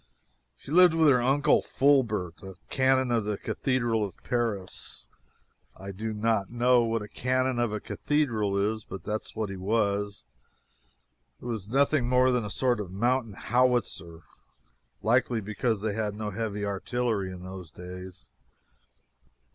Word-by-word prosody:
She - - -11
lived 175 0 +6
with 160 -1 +4
her 125 -3 +4
uncle 145 +4 +3
Fulbert, 115 - +1
a 95 -1 -9 0.2
canon 130 -1 +3
of 115 -2 +2
the 105 -1 -2
cathedral 120 -3 0
of 100 -4 -5
Paris. 115 -6 -3 0.7
I 95 +1 -7
do 110 +4 -4
not 110 -2 0
know 120 +1 +4
what 115 -2 -1
a - - -8
canon 130 +2 0
of 120 -2 +1
a 105 - -2
cathedral 110 -8 0
is, 110 +2 0
but 95 - -8
that 105 +1 -2
is - - -11
what 110 -3 -2
he 95 - -6
was. 100 - -1 1.2
He - - -13
was 110 -5 -4
nothing 135 0 +2
more 125 0 +4
than 125 -2 +1
a 105 - -5
sort 125 +1 +1
of 105 - -4
a 90 - -12
mountain 120 +2 0
howitzer, 120 -8 0 0.8
likely, 120 0 +2
because 105 +1 -1
they 110 -2 0
had 105 -1 -2
no 105 0 -4
heavy 105 -1 -3
artillery 100 0 -1
in 90 -1 -9
those 95 -2 -8
days. 90 +2 -10
110 Hz, 155 wpm, -28 LUFS, 100-125 Hz, 1.2 s, lived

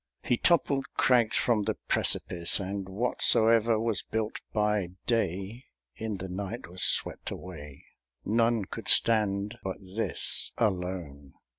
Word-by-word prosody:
He 120 - +1
toppled 140 -2 +1
crags 120 -4 +3
from 110 -4 +1
the - - -1
precipice, 85 -1 +1
And 100 0 -5
whatsoe'er 115 +1 +3
was 115 -2 -1
built 110 0 -4
by 105 -3 0 0.2
dayIn 100 0 -2 0.6
the 95 +1 -7
night 100 +5 -6
was 90 +2 -6
swept - - +1
away:None 90 - -4
could - - -9
stand 105 -1 +4
but 95 -1 -4
this 95 +4 -2
alone. 90 - -3
100 Hz, 115 wpm, -28 LUFS, 90-115 Hz, 0.6 s, stand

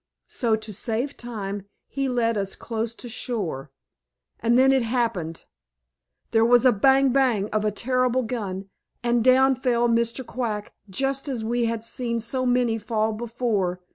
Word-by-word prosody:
So 230 -3 +1
to 215 -1 -7
save 235 +6 -2
time 205 -4 -6 0.2
he 275 -1 -2
led 235 -2 +1
us 195 -2 -2
close 225 0 -4
to 245 - -9
shore. 200 - -3 0.7
And 235 +1 +3
then 265 +1 +6
it 265 -1 +3
happened. 225 -9 -2 0.9
There 225 0 +4
was 245 +2 +5
a 255 - +7
bang, 270 +5 +4
bang 245 -6 +2
of 215 0 0
a 215 - +2
terrible 255 +3 +1
gun, 200 -5 -4 0.4
and 240 -1 +2
down 260 +1 +5
fell 245 -2 +1
Mr. 235 +2 0
Quack 220 -5 -4 0.2
just 270 +8 -1
as 235 -5 -3
we 240 +1 +1
had 230 -1 -2
seen 235 -1 -2
so 255 +3 -2
many 245 -2 +2
fall 220 0 0
before. 220 -5 -1
235 Hz, 160 wpm, -24 LUFS, 215-255 Hz, 0.9 s, a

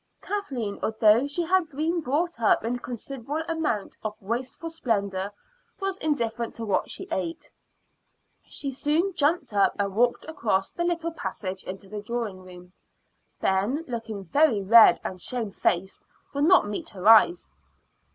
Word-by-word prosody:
Kathleen, 265 - -4
although 220 +4 +4
she 315 +5 -1
had 355 -1 +2
been 325 +4 -1
brought 300 +2 -1
up 220 - +4
in 240 +2 -1
a - - -12
considerable 270 +5 -5
amount 320 - -2
of 215 0 -4
wasteful 250 - -4
splendor, 200 - -1 0.5
was 390 0 -2
indifferent 235 -6 -1
to 230 - -5
what 200 - 0
she - - -7
ate. 170 -3 -4 0.9
She 275 - -5
soon 310 +8 0
jumped 290 -5 0
up 200 -1 +3
and 200 -1 -1
walked 240 +2 +2
across 210 -11 -1
the 345 - -3
little 335 -1 -1
passage 190 - -5
into 190 +1 -7
the 210 +1 -6
drawing 215 -3 -4
room. 180 0 -13 0.7
Ben, 210 +12 +1
looking 225 -5 -5
very 260 - +3
red 225 +3 +8
and 185 -1 -5
shamefaced, 195 -6 -2 0.3
would 285 +1 +1
not 355 - +5
meet 205 - -5
her 190 0 -4
eyes. 225 +11 +6
235 Hz, 150 wpm, -26 LUFS, 200-310 Hz, 0.9 s, red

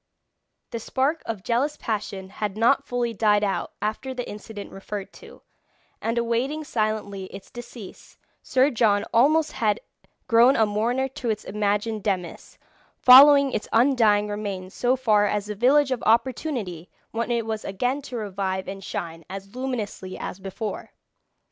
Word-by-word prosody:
The 230 - -3
spark 275 +7 -1
of 220 -5 -4
jealous 270 +6 0
passion 200 -3 -4
had 205 0 -4
not 275 +5 +3
fully 240 -1 -1
died 210 -1 +3
out 195 -2 -2
after 240 +5 -3
the 245 - -4
incident 210 0 -8
referred 195 +1 -7
to, - - -15 0.6
and 230 +1 -1
awaiting 240 +6 -1
silently 215 -6 -2
its 195 +1 -11
decease, 240 -4 -11 0.2
Sir 265 +2 +2
John 215 -4 +2
almost 300 +7 +4
had 215 -2 0 0.5
grown 240 +3 +6
a 220 - +4
mourner 235 +6 0
to 265 -3 -5
its 215 -1 -2
imagined 210 +1 -1
demise, 190 -4 -4 0.4
following 280 +2 +8
its 210 - -3
undying 225 -4 +4
remains 200 -2 -5
so 250 +1 +1
far 215 -5 +3
as 205 0 -1
the 210 - -4
village 265 +6 +3
of 255 - -1
Opportunity, 230 - 0 0.2
when 230 +1 -2
it 235 -2 0
was 220 -1 -3
again 245 +9 -1
to 260 -3 -8
revive 195 -3 -3
and 195 0 -7
shine 165 -2 -5
as 195 +2 -8
luminously 235 -7 -4
as 180 - -6
before. 195 +3 -6
220 Hz, 150 wpm, -24 LUFS, 205-250 Hz, 0.6 s, following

